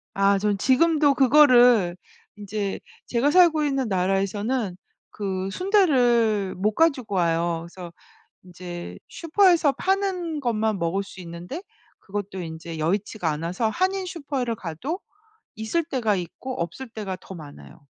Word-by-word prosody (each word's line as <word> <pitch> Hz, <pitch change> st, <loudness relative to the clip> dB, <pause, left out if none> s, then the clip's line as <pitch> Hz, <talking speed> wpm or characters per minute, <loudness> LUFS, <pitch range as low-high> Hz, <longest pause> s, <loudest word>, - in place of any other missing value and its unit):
아 195 Hz, 0 st, +3 dB
저는 205 Hz, 0 st, 0 dB
지금도 290 Hz, +5 st, +3 dB
그거를 245 Hz, -8 st, +5 dB, 0.4 s
인제 205 Hz, -1 st, -4 dB, 0.3 s
제가 255 Hz, +5 st, +1 dB
살고 335 Hz, -3 st, +5 dB
있는 270 Hz, -4 st, 0 dB
나라에서는 195 Hz, +3 st, -1 dB, 0.3 s
그 190 Hz, -2 st, -3 dB
순대를 245 Hz, -, +2 dB
못 210 Hz, +3 st, 0 dB
가지고 270 Hz, -11 st, +1 dB
와요. 170 Hz, -1 st, 0 dB
그래서 175 Hz, -1 st, -10 dB, 0.5 s
인제 175 Hz, -1 st, -8 dB
슈퍼에서 340 Hz, -3 st, +3 dB
파는 375 Hz, -5 st, -1 dB
것만 220 Hz, -6 st, 0 dB
먹을 175 Hz, +4 st, -1 dB
수 195 Hz, -, -13 dB
있는데 175 Hz, -, -7 dB, 0.4 s
그것도 195 Hz, -2 st, -5 dB
인제 165 Hz, 0 st, -7 dB
여의치가 185 Hz, +1 st, -1 dB
않아서 170 Hz, +9 st, -2 dB
한인 375 Hz, -, 0 dB
슈퍼에를 275 Hz, -9 st, -3 dB
가도 215 Hz, -, -5 dB, 0.6 s
있을 220 Hz, +10 st, -1 dB
때가 240 Hz, -9 st, 0 dB
있고 185 Hz, +9 st, -6 dB
없을 205 Hz, +10 st, -6 dB
때가 210 Hz, -4 st, -5 dB
더 190 Hz, -, -10 dB
많아요. 150 Hz, -1 st, -12 dB
215 Hz, 285 characters per minute, -24 LUFS, 185-285 Hz, 0.6 s, 그거를